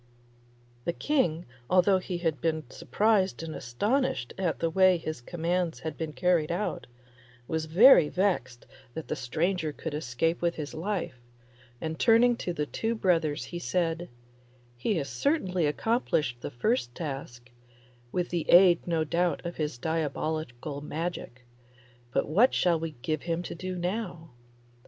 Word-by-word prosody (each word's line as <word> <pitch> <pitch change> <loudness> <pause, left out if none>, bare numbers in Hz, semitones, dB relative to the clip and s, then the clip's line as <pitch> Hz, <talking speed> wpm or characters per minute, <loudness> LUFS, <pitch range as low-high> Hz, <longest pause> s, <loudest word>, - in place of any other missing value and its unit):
The 170 - 0
King, 175 - 0 0.2
although 185 +1 +4
he 180 -1 -4
had 165 -5 -1
been 160 -4 -1
surprised 205 -5 +1
and 160 -1 -5
astonished 205 - -1
at 185 -4 -1
the 165 -1 -1
way 185 +1 +5
his 155 -5 -5
commands 170 +3 -2
had 160 - -4
been 160 -2 -4
carried 160 +2 +1
out, 180 -1 -2 0.6
was 160 0 -1
very 170 - +7
vexed 175 -11 -1 0.3
that 160 - -6
the - - -1
stranger 160 +5 -1
should 160 - -4
escape 155 +3 -1
with 170 0 +1
his 150 -2 -5
life, 175 -6 -3 0.6
and 160 0 -4
turning 235 +1 +5
to 180 - -3
the 150 -3 -2
two 225 +9 -2
brothers 165 -8 +1
he 175 - -6
said, 170 +4 -1 0.7
'He 130 - -1
has 145 -5 -2
certainly 180 - 0
accomplished 150 - 0
the - - -4
first 120 0 -1
task, 135 -6 -6 0.6
with 180 -1 -1
the 170 -2 -2
aid 175 -1 +6
no 165 -2 +1
doubt 170 +3 0
of 170 - -5
his 150 -5 -2
diabolical 155 -2 -3
magic; 150 -5 -5 0.7
but - - 0
what 205 - +4
shall 170 -2 +3
we 160 -1 -5
give 155 -1 -1
him 170 0 -2
to - - -6
do 185 +2 -5
now? 175 -3 -4
165 Hz, 150 wpm, -28 LUFS, 150-180 Hz, 0.7 s, very